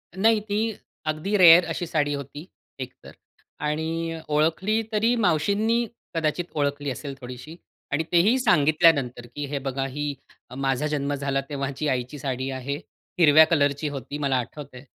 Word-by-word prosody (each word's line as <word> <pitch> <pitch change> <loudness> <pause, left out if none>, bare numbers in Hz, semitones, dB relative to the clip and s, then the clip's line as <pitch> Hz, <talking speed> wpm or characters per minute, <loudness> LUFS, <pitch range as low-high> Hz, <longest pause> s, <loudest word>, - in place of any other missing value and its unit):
नाही, 220 +3 +4
ती 215 +2 -1 0.3
अगदी 155 +7 -1
रेअर 175 -1 +8
अशी 175 +1 -3
साडी 145 -2 0
होती 145 +3 -7 0.3
एकतर 130 - -9 0.5
आणि 160 +2 -2
अ, 165 - -6
ओळखली 165 +9 +1
तरी 225 +3 +2
मावशींनी 210 +5 +1 0.3
कदाचित 165 +2 0
ओळखली 145 -1 -1
असेल 140 +2 -6
थोडीशी 125 +6 -9 0.4
आणि 145 +4 +1
तेही 200 +9 +4
सांगितल्यानंतर 155 - +3
की 145 0 -3
हे 140 0 -3
बघा 135 0 -2
ही 145 +2 -3 0.4
माझा 135 +2 0
जन्म 145 -1 -1
झाला 140 -1 -1
तेव्हाची 140 +1 -3
आईची 130 +2 -2
साडी 130 -1 -3
आहे. 135 +2 -4 0.4
हिरव्या 155 -1 +8
कलरची 145 -2 +1
होती 140 0 -6
मला 140 -3 0
आठवतं 130 +2 -6
आहे 130 - -13
150 Hz, 150 wpm, -25 LUFS, 140-170 Hz, 0.5 s, रेअर